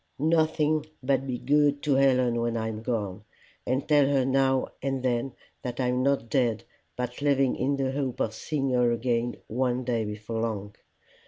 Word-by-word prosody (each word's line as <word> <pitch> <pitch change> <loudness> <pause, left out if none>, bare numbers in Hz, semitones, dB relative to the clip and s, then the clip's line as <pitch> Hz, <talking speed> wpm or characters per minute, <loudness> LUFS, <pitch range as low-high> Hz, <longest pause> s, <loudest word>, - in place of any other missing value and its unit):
"Nothing 155 0 +2 0.2
but 135 0 +1
be 125 -2 -2
good 145 +1 +2
to 145 - +2
Helen 130 -3 +3
when 115 0 -1
I 110 0 -2
am 110 0 -5
gone, 105 -4 -3 0.4
and 130 +2 0
tell 145 -3 +5
her 135 -2 +2
now 135 0 +2
and 135 -1 -2
then 125 0 0 0.3
that 125 -1 -5
I'm 125 0 +1
not 140 -3 +1
dead, 115 -3 +1 0.3
but 125 +1 -4
living 135 -2 +2
in 140 +3 0
the 135 -1 0
hope 135 -2 -3
of 110 - 0
seeing 135 +3 -2
her 125 -1 +3
again 120 0 0
one 125 +2 -1
day 120 -2 0
before 105 +2 -5
long. 105 -3 -3
130 Hz, 175 wpm, -27 LUFS, 120-135 Hz, 0.4 s, tell